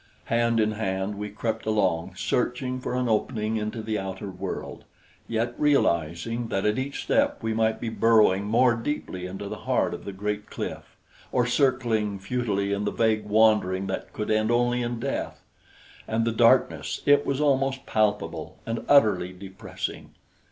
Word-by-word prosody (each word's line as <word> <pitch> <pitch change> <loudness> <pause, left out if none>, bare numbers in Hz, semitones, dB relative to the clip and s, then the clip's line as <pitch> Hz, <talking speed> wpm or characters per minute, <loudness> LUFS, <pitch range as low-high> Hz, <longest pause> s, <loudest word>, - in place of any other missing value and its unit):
Hand 115 0 +2
in 110 0 +2
hand 95 -2 -2
we 105 +1 -5
crept 110 +1 -3
along, 95 -4 0
searching 125 +4 -1
for 125 - -3
an 125 -1 0
opening 110 0 0
into 110 +1 -3
the 110 -1 -2
outer 95 +1 -5
world, 90 - -6 0.4
yet 115 +1 -1
realizing 115 - +1
that 95 -3 -1
at 105 +3 +2
each 135 +2 -4
step - - +1
we 110 0 0
might 110 0 +1
be - - -4
burrowing 110 -4 +4
more 120 +3 +4
deeply 115 -7 -4
into 95 +2 -6
the - - -6
heart - - +2
of - - -7
the 100 - -5
great 105 +2 -4
cliff, - - -6 0.3
or 125 -1 +2
circling 120 -5 +1
futilely 100 -1 -1
in 100 +1 -1
the 105 - -1
vague 110 -2 +1
wandering 105 -3 +3
that 95 0 -4
could 105 - -3
end 110 0 +2
only 120 +1 +2
in 120 -1 -3
death. - - -4 0.6
And 115 +1 0
the 115 - +1
darkness! 115 +1 +3
It 145 0 +5
was 140 -1 -1
almost 135 -2 +1
palpable, 110 -1 -1
and 115 0 -3
utterly 105 -10 +4
depressing. 95 0 -7
110 Hz, 165 wpm, -26 LUFS, 100-120 Hz, 0.6 s, It